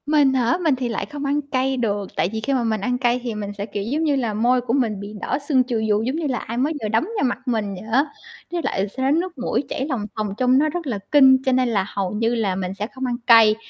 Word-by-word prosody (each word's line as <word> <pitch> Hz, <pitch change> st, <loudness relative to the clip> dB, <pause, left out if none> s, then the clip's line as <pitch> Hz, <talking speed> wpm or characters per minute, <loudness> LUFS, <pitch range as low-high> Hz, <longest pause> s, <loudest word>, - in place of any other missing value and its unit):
Mình 290 Hz, -2 st, +4 dB
hả? 250 Hz, +3 st, +2 dB
Mình 310 Hz, -5 st, +3 dB
thì 250 Hz, -2 st, -3 dB
lại 230 Hz, -, -2 dB
không 290 Hz, -1 st, -6 dB
ăn 285 Hz, +2 st, +1 dB
cay 270 Hz, -1 st, -1 dB
được, 205 Hz, -5 st, -2 dB
tại -, -, +1 dB
vì 220 Hz, -, -2 dB
khi 275 Hz, +5 st, -1 dB
mà 255 Hz, -3 st, +1 dB
mình 220 Hz, -3 st, -1 dB
ăn 250 Hz, +4 st, 0 dB
cay 245 Hz, -1 st, +1 dB
thì 235 Hz, -3 st, -3 dB
mình 205 Hz, -1 st, -4 dB
sẽ, 200 Hz, -, -3 dB
kiểu, 205 Hz, -1 st, -4 dB
giống 285 Hz, +9 st, -1 dB
như 295 Hz, -3 st, +2 dB
là, 235 Hz, -5 st, -1 dB
môi 245 Hz, +4 st, +2 dB
của 240 Hz, -1 st, -2 dB
mình 230 Hz, -7 st, +1 dB
bị 200 Hz, +1 st, -7 dB
đỏ -, -, -1 dB
sưng 260 Hz, -4 st, +4 dB
chù 245 Hz, -2 st, -2 dB
vù 210 Hz, 0 st, +3 dB
giống 255 Hz, +5 st, -1 dB
như 325 Hz, -2 st, -1 dB
là 255 Hz, -3 st, -1 dB
ai 230 Hz, +2 st, -6 dB
mới 285 Hz, +6 st, +1 dB
vừa -, -, 0 dB
đấm 220 Hz, +1 st, +2 dB
vào 410 Hz, -, 0 dB
mặt 250 Hz, -, 0 dB
mình 215 Hz, -5 st, -1 dB
vậy 185 Hz, -, -9 dB
á, 270 Hz, +5 st, +4 dB, 0.5 s
với 350 Hz, -1 st, -1 dB
lại 195 Hz, +2 st, -1 dB
sẽ 260 Hz, +6 st, -1 dB
nước 340 Hz, +2 st, 0 dB
mũi 250 Hz, +2 st, -1 dB
chảy 265 Hz, -, -2 dB
lòng 250 Hz, -8 st, -2 dB
thòng 215 Hz, -1 st, -1 dB
trông 255 Hz, +1 st, +3 dB
nó 310 Hz, +1 st, +2 dB
rất 340 Hz, 0 st, -4 dB
là 220 Hz, -6 st, -2 dB
kinh, 265 Hz, -2 st, +6 dB
cho 260 Hz, -, +3 dB
nên 255 Hz, -1 st, +2 dB
là 200 Hz, -4 st, +1 dB
hầu 195 Hz, -3 st, -2 dB
như 225 Hz, +3 st, 0 dB
là 205 Hz, -5 st, 0 dB
mình 185 Hz, 0 st, -3 dB
sẽ 205 Hz, +2 st, -4 dB
không 260 Hz, +1 st, -6 dB
ăn 245 Hz, -1 st, -1 dB
cay. 225 Hz, -3 st, +7 dB
245 Hz, 295 wpm, -22 LUFS, 215-270 Hz, 0.5 s, cay